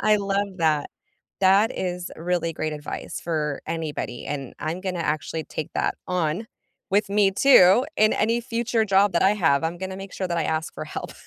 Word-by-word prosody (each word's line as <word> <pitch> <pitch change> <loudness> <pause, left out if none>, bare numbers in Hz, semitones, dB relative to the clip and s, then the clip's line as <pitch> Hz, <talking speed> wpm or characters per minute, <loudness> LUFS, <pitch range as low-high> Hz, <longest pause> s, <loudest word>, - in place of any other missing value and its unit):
I 215 0 +4
love 200 -1 -2
that. 155 -3 +1 0.5
That 195 +3 +4
is 180 -1 -3
really 170 0 -1
great 155 0 -3
advice 145 0 -6
for 150 -4 -2
anybody, 155 -6 -4
and 140 -3 -5
I'm 165 +4 -3
gonna 185 -2 -3
actually 155 0 -2
take 155 - -5
that - - 0
on 180 +4 -1 0.4
with 205 +1 +2
me 200 -1 +4
too 200 +1 +6
in 215 0 +4
any 230 +3 +1
future 235 -1 0
job 195 -1 +3
that 170 - +2
I 190 - +5
have. 160 -7 +2
I'm 170 +1 -2
gonna 190 0 -5
make 195 0 -9
sure 185 -2 -3
that 170 - -1
I 160 - 0
ask 160 +1 -2
for - - -5
help. - - -6
180 Hz, 190 wpm, -24 LUFS, 160-200 Hz, 0.5 s, too